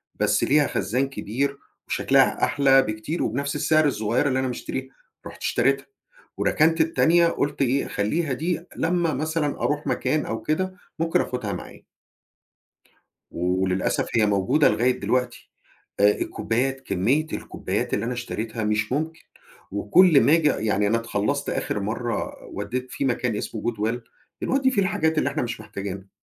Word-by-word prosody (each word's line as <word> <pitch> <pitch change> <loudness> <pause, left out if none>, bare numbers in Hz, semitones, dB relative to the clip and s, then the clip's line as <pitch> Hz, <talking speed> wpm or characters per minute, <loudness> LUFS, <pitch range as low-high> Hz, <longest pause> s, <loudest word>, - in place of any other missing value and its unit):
بس 105 0 +1
ليها 150 +1 +4
خزان 130 +7 -1
كبير 140 +3 -2 0.3
وشكلها - - +2
أحلى 135 -1 +4
بكتير 110 +8 -3
وبنفس 140 +6 -2
السعر 155 +1 +3
الصغيرة 115 +2 0
اللي 130 0 +1
أنا 130 - 0
مشتريها، 130 +1 -5 0.4
رُحت - - -12
اشتريتها، 135 +3 +1 0.5
وركنت 160 +1 +3
التانية، 165 +1 +4
قُلت 145 -3 -1
إيه 135 +1 +1
خلّيها 140 +8 -1
دي 170 +5 -2
لمّا 170 -1 +1
مثلًا 155 0 -1
أروح 145 +1 -1
مكان 155 0 0
أو 110 0 -4
كده 185 +8 -1 0.3
ممكن 165 0 +2
آخُدها 115 -6 -3
معايا. 90 - -9 1.5
وللأسف 90 +1 0
هي 110 -2 +4
موجودة 100 +9 +3
لغاية 125 +1 +1
دلوقتي. 125 -1 -1 0.5
آآ 105 0 +6
الكوبايات، 135 +4 -1
كمية 130 - +1
الكوبايات - - -3
اللي - - -1
أنا 125 - -2
اشتريتها 115 -2 -4
مش 105 +2 0
ممكن، 160 +3 -2 0.5
وكُل 140 - +5
ما 150 - +4
آجي 160 -3 +4
يعني 105 -5 +1
أنا 115 +3 +2
اتخلصت 105 -2 -1
آخر 105 - -2
مرّة 115 +3 -3 0.2
وَدَيت 125 +1 -4
في 140 - -2
مكان 125 -3 0
اسمه 110 - -5
goodwill 115 0 -1 0.4
بنودي 265 0 +2
فيه 200 -6 +2
الحاجات 160 -4 +1
اللي 140 - +1
إحنا 140 - -2
مش 120 -1 -4
محتاجينها. 100 -1 -7
130 Hz, 145 wpm, -24 LUFS, 110-155 Hz, 1.5 s, آآ